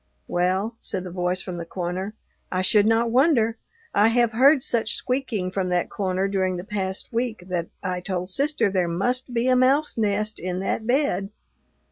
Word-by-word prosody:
"Well," 190 +6 0
said 185 - -3
the 180 - -7
voice 180 +1 -1
from 180 -2 -6
the 170 - -4
corner, 185 +4 -4 0.4
"I 185 0 0
should 205 +2 +4
not 225 +1 +2
wonder. 235 -4 +3 0.3
I 210 - +5
have 235 0 +3
heard 265 +4 +5
such 225 -2 0
squeaking 245 -8 -2
from 185 -1 -1
that 180 -1 0
corner 190 -1 -1
during 190 -2 0
the 175 - -5
past 195 +1 -3
week 230 -4 -2
that 170 -2 -2 0.2
I 185 -1 -2
told 180 -1 -3
sister 280 -2 +1
there 185 -2 +1
must 245 +10 -1
be 240 +1 0
a 255 - +4
mouse 265 +1 +3
nest 215 0 0
in 180 +1 -3
that 220 +3 -2
bed." 245 -8 +1
200 Hz, 180 wpm, -24 LUFS, 185-235 Hz, 0.4 s, I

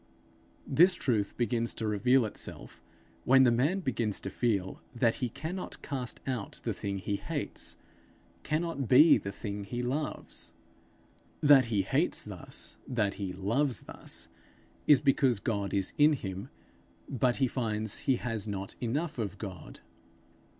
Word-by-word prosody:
This 180 +3 +5
truth 110 -10 -1
begins 120 -1 0
to 110 - -3
reveal 115 +4 +3
itself 105 - -4 0.4
when 130 +1 +6
the 125 - +5
man 145 +12 +1
begins 115 - -1
to 95 - -5
feel 100 -4 -1
that 115 -1 +2
he 125 - 0
cannot 170 - -6
cast 130 -3 -4
out 125 -6 -4
the - - -1
thing 100 -1 -3
he 100 +2 -2
hates, - - -4 0.6
cannot 155 -3 -2
be 145 +7 +7
the 100 - -5
thing 100 0 -5
he 120 +5 -4
loves. 140 +5 -2 0.9
That 145 -3 +7
he 105 -4 +1
hates 95 - +1
thus, - - -6
that 105 -6 0
he 95 -2 -2
loves 115 +7 +1
thus, - - -6 0.6
is 145 -3 +8
because 135 -5 +3
God 100 -3 -2
is 95 -2 -1
in 150 +1 +7
him, 95 -7 -5 0.6
but 125 -1 +1
he 135 - +2
finds 110 -4 -2
he 130 - +6
has 115 -4 -3
not 100 -2 -4
enough 145 +5 -2
of 100 -3 -3
God. 95 -3 -8
120 Hz, 145 wpm, -30 LUFS, 100-135 Hz, 0.9 s, is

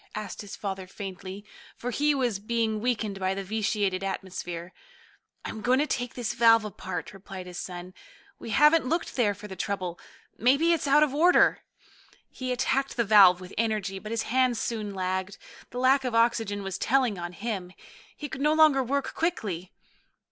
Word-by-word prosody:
asked 210 -2 -5
his 205 -2 -8
father 190 -2 -5
faintly, 195 +1 -8 0.3
for 245 - -4
he 295 +4 +2
was 245 -7 0
being 220 0 -1
weakened 215 -5 -1
by 190 0 0
the 195 - -4
vitiated 205 -2 -1
atmosphere. 180 -2 -5 0.7
"I'm 220 - -5
going 250 +4 +3
to 290 - +2
take 245 -5 -3
this 240 -3 -2
valve 230 -1 +5
apart," 180 -4 -6
replied 190 -1 -9
his 180 -1 -7
son. 180 0 -7 0.5
"We - - -8
haven't 300 +6 +5
looked 330 +1 -1
there 210 -5 +2
for 205 +1 -10
the 190 - -8
trouble. 185 -3 -3 0.4
Maybe 280 +9 +4
it's 315 -3 -1
out 290 +2 +6
of 290 -3 0
order." 345 +5 +5 0.7
He 255 -1 -4
attacked 265 +2 0
the 235 - +3
valve 195 -4 +7
with 185 0 -11
energy, 210 -4 -1
but 215 - -8
his 230 -1 -1
hands 250 -1 +1
soon 210 -4 -3
lagged. 185 +1 -2 0.3
The 245 - -8
lack 265 +2 +4
of 250 -3 -2
oxygen 225 -3 +1
was 195 -1 -4
telling 250 -6 +1
on 175 0 -5
him. 200 -3 -4 0.5
He 295 - -5
could 270 -1 -7
no 300 +1 +3
longer 310 -4 +5
work 275 +2 -2
quickly. 200 - -2
215 Hz, 175 wpm, -27 LUFS, 195-255 Hz, 0.7 s, valve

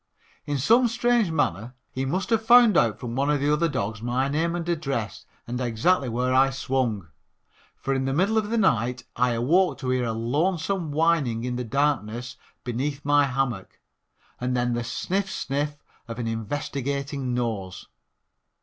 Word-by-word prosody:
In 145 -1 -1
some 230 - +4
strange 240 -3 +2
manner 125 - -1 0.2
he 130 +1 -3
must 185 - -2
have 225 -1 +2
found 235 -2 +7
out 120 -9 +3
from 120 -1 -5
one 140 +2 +1
of 150 -1 +2
the 145 +2 +2
other 165 +2 +2
dogs 105 -5 -3
my 125 +3 0
name 165 +4 0
and 170 -1 -4
address 135 - -3 0.2
and 125 +2 -4
exactly 125 +5 +1
where 125 +2 0
I 135 +1 +5
swung, 130 -9 -2 0.7
for 135 - -2
in 135 0 -1
the 135 - 0
middle 190 +9 +2
of 210 -1 -4
the 230 - 0
night 125 - +1
I 125 0 +2
awoke 165 +11 +2
to 130 -2 -2
hear 130 -1 +1
a 115 - -1
lonesome 160 - -1
whining 145 -7 +1
in 125 0 -2
the 125 - -2
darkness 120 -2 -1 0.3
beneath 135 +4 -3
my 145 0 +4
hammock 125 -6 -3 0.6
and 125 0 -1
then 120 0 0
the 120 0 -1
sniff, 190 +10 -2
sniff 145 -2 -2 0.3
of 115 -1 -6
an 120 - -3
investigating 135 +3 -3
nose. 105 -7 -3
135 Hz, 170 wpm, -25 LUFS, 120-160 Hz, 0.7 s, found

